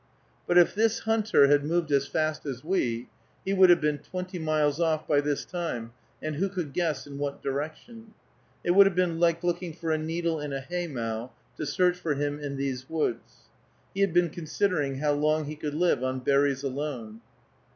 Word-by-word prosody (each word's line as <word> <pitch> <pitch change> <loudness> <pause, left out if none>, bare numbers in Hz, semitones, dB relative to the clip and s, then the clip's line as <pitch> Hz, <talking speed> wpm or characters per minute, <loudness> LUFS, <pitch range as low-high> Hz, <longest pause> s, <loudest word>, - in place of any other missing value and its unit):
But 175 - +3
if 175 - +6
this 225 +1 +1
hunter 220 -9 +4
had 145 0 +4
moved 165 0 0
as 140 0 +2
fast 155 0 -1
as 130 -1 -5
we, 125 -9 -1 0.4
he 195 - 0
would 190 -1 +6
have 175 - +7
been 150 -1 0
twenty 185 +3 -6
miles 155 -1 +1
off 160 -2 +1
by 145 -2 +3
this 145 -1 -2
time, 145 -11 -4 0.3
and 155 -1 -3
who 195 +4 0
could 175 -7 -4
guess 165 -3 -1
in 140 -1 -8
what 140 -1 -4
direction? 185 - -5 0.5
It 175 - +2
would 195 +2 +8
have 195 - -1
been 175 -2 +1
like 170 0 +2
looking 175 -1 -1
for 165 -1 -3
a 155 - +1
needle 165 +1 -1
in 145 -1 -4
a 135 - -2
haymow, 130 -8 -4 0.3
to - - -4
search 180 +2 +2
for 160 -4 -1
him 145 +1 -2
in 140 -2 -5
these 130 -1 -3
woods. 155 -7 -3 0.5
He 195 - -2
had 195 -2 +3
been 175 -1 +3
considering 155 -3 -1
how 150 +2 +1
long 155 +1 +1
he 150 +1 -5
could 150 -1 -4
live 165 -6 +2
on 130 0 -2
berries 140 0 +2
alone. 130 -5 -4
155 Hz, 195 wpm, -27 LUFS, 140-175 Hz, 0.5 s, would